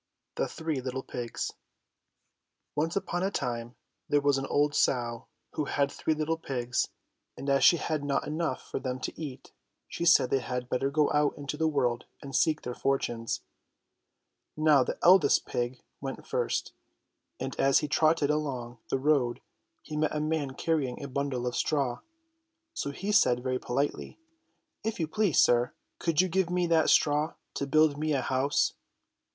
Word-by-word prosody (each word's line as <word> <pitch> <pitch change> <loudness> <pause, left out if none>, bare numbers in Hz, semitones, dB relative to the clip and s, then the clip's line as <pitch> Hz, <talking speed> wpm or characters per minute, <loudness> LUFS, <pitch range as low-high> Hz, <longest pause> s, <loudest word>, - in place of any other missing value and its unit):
THE - - -1
THREE 160 -4 -3
LITTLE 130 +1 -4
PIGS 120 -2 -4 1.2
ONCE 160 +3 -1
upon 175 -3 -1
a 190 - +1
time 120 -8 -3 0.3
there 145 - +4
was 140 -1 +2
an 135 - -4
old 145 0 +2
sow 120 -5 0 0.2
who 150 - -2
had 140 0 0
three 160 - -1
httle 160 +1 -1
pigs, 125 -4 -1 0.5
and 140 - -7
as 140 - +3
she 170 - +7
had 155 -2 -2
not 140 -1 0
enough 155 -3 -2
for - - -3
them 130 -1 -3
to - - -4
eat, 140 -5 -7 0.4
she 170 - -5
said 165 -6 +5
they 135 - +3
had 125 -1 -4
better 135 +3 0
go 150 +1 +2
out 150 -1 +2
into 145 0 -4
the 160 +1 +1
world 125 -6 0
and 135 -1 -7
seek 155 -1 +2
their 125 - -4
fortunes. 120 -4 -1 1.2
Now 155 -3 +5
the - - -4
eldest 175 -5 +6
pig 120 +1 -3 0.2
went 135 -1 -6
first, 120 -1 -1 0.7
and 130 +1 -4
as 135 0 +5
he - - -3
trotted 155 -1 +3
along 130 -6 -3
the - - +1
road 135 -3 +2 0.4
he 155 - -7
met 155 0 0
a - - 0
man 150 -3 -1
carrying 145 -6 -1
a - - -4
bundle 135 -2 -2
of 125 - -2
straw. 140 -5 0 0.7
So 325 - -3
he 195 +9 -3
said 125 -11 +4
very 130 -1 -1
politely: 140 +4 -2 0.7
"If 220 -2 -2
you 160 - 0
please, 180 +1 +1
sir, 120 0 +4 0.3
could 165 -1 +2
you 185 - +1
give 185 0 +1
me 180 0 +1
that 165 -2 +3
straw 150 +2 +3 0.2
to 140 - -3
build 155 0 +3
me 155 0 0
a 135 - +1
house 130 +3 +1
?" - - -49
140 Hz, 175 wpm, -29 LUFS, 130-155 Hz, 1.2 s, she